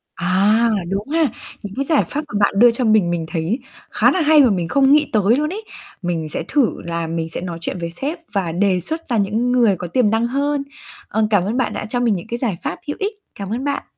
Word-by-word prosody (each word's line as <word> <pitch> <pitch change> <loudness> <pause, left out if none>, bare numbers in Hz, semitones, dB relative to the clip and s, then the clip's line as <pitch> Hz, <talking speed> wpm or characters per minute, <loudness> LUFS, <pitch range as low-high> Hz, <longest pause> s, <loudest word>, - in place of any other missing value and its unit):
À, 190 +5 +2 0.3
đúng 200 +4 -3
ha. 315 -1 +2 0.3
Những 200 +1 -7
cái 275 +1 -1
giải 310 -1 +3
pháp 300 +2 -3
mà 205 - 0
bạn 200 - +3
đưa 240 +2 +7
cho 245 +2 -2
mình, 215 -5 +4
mình 165 -2 -2
thấy 175 +9 -1 0.3
khá - - +4
là 370 - +1
hay 305 -1 +6
và 250 - +5
mình 175 -4 0
không 275 - +4
nghĩ 300 0 +3
tới 215 +2 +4
luôn 300 +1 0
ấy 435 +2 -6 0.4
mình 165 -3 -2
sẽ - - -3
thử 280 -6 +1
là 170 -1 -3
mình 165 0 -3
sẽ 165 - -5
nói 175 -2 -5
chuyện 180 - -4
với 170 0 -4
sếp 285 - -4
và 185 -5 -1
đề 185 +1 +1
xuất 320 - -5
ra 240 -4 0
những 220 +5 +1
người 235 -6 +4
có 175 0 -6
tiềm 215 +3 +2
năng 225 +2 +1
hơn. 280 +2 -1 0.4
Ờ, 215 0 0
cảm 200 -4 +3
ơn 220 +6 -2
bạn 255 - 0
đã - - -4
cho 245 +3 -2
mình 230 -4 +2
những 180 +5 -6
cái 235 - -2
giải 225 -9 -2
pháp - - -2
hữu 290 - -3
ích. 405 +2 -1 0.2
Cảm 200 +1 -5
ơn 250 +4 -3
bạn. 285 -1 -2
215 Hz, 260 wpm, -20 LUFS, 180-275 Hz, 0.4 s, đưa